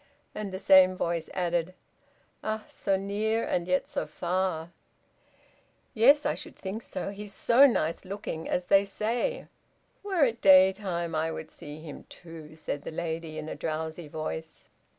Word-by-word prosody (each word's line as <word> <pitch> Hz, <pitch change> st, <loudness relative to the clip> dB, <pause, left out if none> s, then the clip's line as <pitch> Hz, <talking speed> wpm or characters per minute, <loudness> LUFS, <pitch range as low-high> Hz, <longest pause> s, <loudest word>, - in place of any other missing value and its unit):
And 210 Hz, -2 st, -5 dB
the 185 Hz, -, -4 dB
same 190 Hz, -1 st, +6 dB
voice 170 Hz, -2 st, -2 dB
added 175 Hz, 0 st, -1 dB, 0.7 s
"Ah! 215 Hz, 0 st, -2 dB
so 195 Hz, -1 st, -1 dB
near, 210 Hz, +3 st, -1 dB
and 175 Hz, 0 st, -1 dB
yet 185 Hz, 0 st, +1 dB
so -, -, -3 dB
far!" 175 Hz, -2 st, -2 dB, 1.2 s
"Yes, 280 Hz, +7 st, +5 dB
I -, -, +2 dB
should -, -, -8 dB
think 200 Hz, +4 st, -5 dB
so, 200 Hz, -, -5 dB
he 205 Hz, +1 st, -8 dB
is 200 Hz, -, -6 dB
so 250 Hz, +7 st, +6 dB
nice 165 Hz, -, -1 dB
looking, 190 Hz, -4 st, -5 dB
as 180 Hz, -, 0 dB
they 195 Hz, +2 st, +5 dB
say." 230 Hz, -, -2 dB, 0.6 s
"Were 380 Hz, -6 st, +1 dB
it 230 Hz, -2 st, -2 dB
daytime 185 Hz, -3 st, +4 dB
I 160 Hz, +1 st, 0 dB
would 160 Hz, -, -7 dB
see 150 Hz, +1 st, -10 dB
him, 155 Hz, -3 st, -9 dB
too," 160 Hz, -3 st, -11 dB
said 155 Hz, -2 st, -4 dB
the -, -, -6 dB
lady 160 Hz, -1 st, -4 dB
in 155 Hz, 0 st, -5 dB
a -, -, -4 dB
drowsy 160 Hz, +1 st, -4 dB
voice. 160 Hz, +1 st, -6 dB
185 Hz, 160 wpm, -28 LUFS, 160-205 Hz, 1.2 s, same